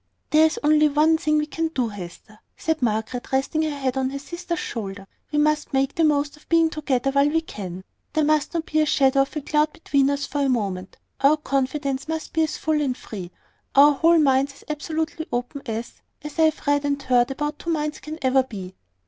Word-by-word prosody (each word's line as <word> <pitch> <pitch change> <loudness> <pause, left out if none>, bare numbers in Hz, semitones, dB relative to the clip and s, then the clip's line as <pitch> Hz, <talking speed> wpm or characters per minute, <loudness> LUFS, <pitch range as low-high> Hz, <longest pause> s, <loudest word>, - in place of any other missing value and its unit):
"There 315 +1 +6
is 320 - -4
only 305 0 +5
one 310 +2 +3
thing 305 -2 +1
we 300 - +1
can 325 +2 -2
do, 255 -7 -1
Hester," 205 +2 -10 0.2
said 320 -2 -1
Margaret, 225 +2 -2
resting 270 +4 +1
her 315 - 0
head 270 -3 -2
on 260 -1 0
her 275 - -5
sister's 345 +4 -5
shoulder. 200 -7 -5 0.3
"We 300 - -1
must 300 0 +1
make 270 0 +1
the 330 - +1
most 290 -1 +2
of 300 - -23
being 330 -1 +4
together 275 -4 0
while 280 +1 +3
we 325 +2 +1
can. 190 - -7 0.3
There 310 - +2
must 305 +2 +1
not 330 -1 -1
be 310 - 0
the 305 - +3
shadow 275 -1 +4
of 275 - -2
a 300 - -2
cloud 300 +1 +1
between 280 -4 +1
us 280 0 -1
for 290 - -2
a 275 - +2
moment. 195 -6 -2 0.2
Our 285 +3 +5
confidence 275 -1 -2
must 320 0 -4
be 320 - +2
as 315 - 0
full 310 -1 0
and 260 -3 -1
free, 185 -5 -8 0.5
our 290 +2 +8
whole 330 +4 +4
minds 275 -2 +3
as - - -17
absolutely 315 +1 -3
open, 245 +4 -3
as 225 +1 -5 0.2
as 300 +2 -7
I 320 - +6
have 315 -1 0
read 285 0 +2
and 285 -1 0
heard 245 -2 +3
that 295 +2 -3
two 340 - -6
minds 300 -2 -1
can 310 +1 -7
never 260 0 +4
be." 195 -8 -8
285 Hz, 220 wpm, -23 LUFS, 260-310 Hz, 0.5 s, our